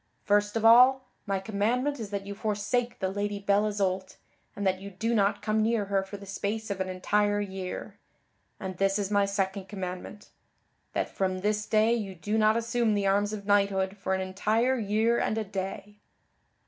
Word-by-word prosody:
First 205 +1 +2
of 225 0 0
all, 255 +3 +6 0.2
my 195 -1 0
commandment 230 +8 -1
is 215 -3 -5
that 200 -1 -4
you 200 - -5
forsake 220 +4 -1
the 190 - -1
Lady 205 +1 -2
Belle 200 +1 +2
Isoult, 190 -2 -2 0.4
and 200 - -3
that 185 -1 +1
you 200 - -7
do 225 +5 -2
not 205 -2 +1
come 215 0 +1
near 220 -1 +1
her 195 0 +1
for 195 +1 -8
the 200 - -11
space 205 +2 -3
of 190 -1 -3
an 185 - -2
entire 205 +3 +1
year. 190 -2 -5 0.6
And 185 -2 -5
this 195 +1 +2
is 205 -1 -2
my 200 -1 +3
second 195 -1 -2
commandment; 185 +1 -7 0.6
that - - 0
from 185 -1 -1
this 210 +1 0
day 220 +2 +3
you 205 -5 -3
do 210 +6 -1
not 215 +1 +4
assume 230 -1 +1
the 200 -1 0
arms 200 +1 +2
of 205 -2 -6
knighthood 200 -1 +2
for 190 -1 -1
an 190 - -2
entire 215 +7 +1
year 220 +3 +2
and 215 - 0
a 220 - 0
day." 195 +1 -6
205 Hz, 190 wpm, -28 LUFS, 195-215 Hz, 0.6 s, all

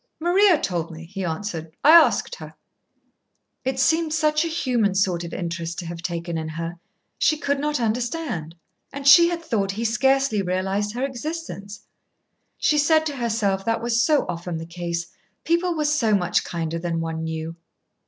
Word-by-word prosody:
"Maria 355 +1 +4
told 170 -3 -2
me," 165 0 -9
he 190 +3 -6
answered, 165 -1 -4
"I 300 - +7
asked 335 +8 +5
her." - - -11 1.1
It 265 0 -2
seemed 320 +3 +2
such 305 -1 +2
a - - -1
human 245 - 0
sort 185 -3 +1
of 170 - -7
interest 170 -1 -4
to 175 - -5
have 170 0 -6
taken 170 -1 -3
in 160 0 -5
her. 165 +2 -5 0.4
She 310 - +3
could 285 -1 -1
not 295 -1 -1
understand. 235 - -2 0.4
And 280 0 -5
she 340 +5 +8
had 340 -1 -4
thought 200 -8 -1
he 225 +3 -3
scarcely 265 -1 +2
realised 190 +3 -1
her 255 +2 -1
existence. 265 -7 -6 0.7
She 300 - +2
said 315 +2 +3
to 290 -3 -3
herself 215 -5 0
that 230 0 0
was 235 0 +2
so 300 +2 +3
often 175 -1 -4
the 165 - -6
case 170 0 -4 0.4
people 340 +2 +1
were 305 -1 -1
so 265 -8 +2
much 180 -2 +1
kinder 165 -1 -3
than 165 -1 -2
one 160 0 -3
knew. 160 0 -4
210 Hz, 175 wpm, -23 LUFS, -, 1.1 s, she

